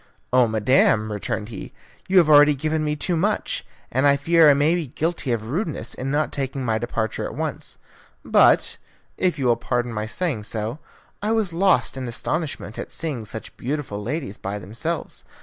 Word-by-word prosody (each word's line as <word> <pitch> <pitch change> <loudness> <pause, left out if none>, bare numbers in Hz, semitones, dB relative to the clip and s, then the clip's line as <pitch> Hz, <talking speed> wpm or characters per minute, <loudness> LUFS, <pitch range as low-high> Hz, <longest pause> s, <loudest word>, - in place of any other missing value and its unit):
"Oh, 125 -2 +5
madam," 110 -1 +3
returned 105 +1 -3
he, 105 -5 -8 0.3
"you 190 - +3
have 170 -4 +7
already 150 -1 +7
given 155 +2 -1
me 150 0 0
too 175 +4 -1
much, 205 +6 0 0.3
and 130 +3 +3
I 140 0 +5
fear 165 +2 +5
I 145 - +6
may 145 +3 +3
have 175 - +1
been 145 -7 -6
guilty 160 -4 -1
of 110 -2 -1
rudeness 135 - -3
in 130 - -4
not 150 +2 0
taking 135 -1 -3
my 110 -1 +1
departure 110 -2 -2
at - - -5
once. - - -3 0.5
But, - - +4 0.4
if 180 -4 0
you 135 - -2
will 120 -2 +3
pardon 120 0 -2
my 105 0 -3
saying 140 -6 -2
so, 110 +6 -3 0.4
I 210 +2 0
was 215 -6 0
lost 165 -9 +2
in 130 -1 -4
astonishment 140 -2 -3
at - - -6
seeing 140 -9 -2
such 110 +1 -8
beautiful 130 -6 -3
ladies 125 -2 -4
by 100 +1 -4
themselves. 115 - -3
135 Hz, 185 wpm, -23 LUFS, 115-160 Hz, 0.5 s, have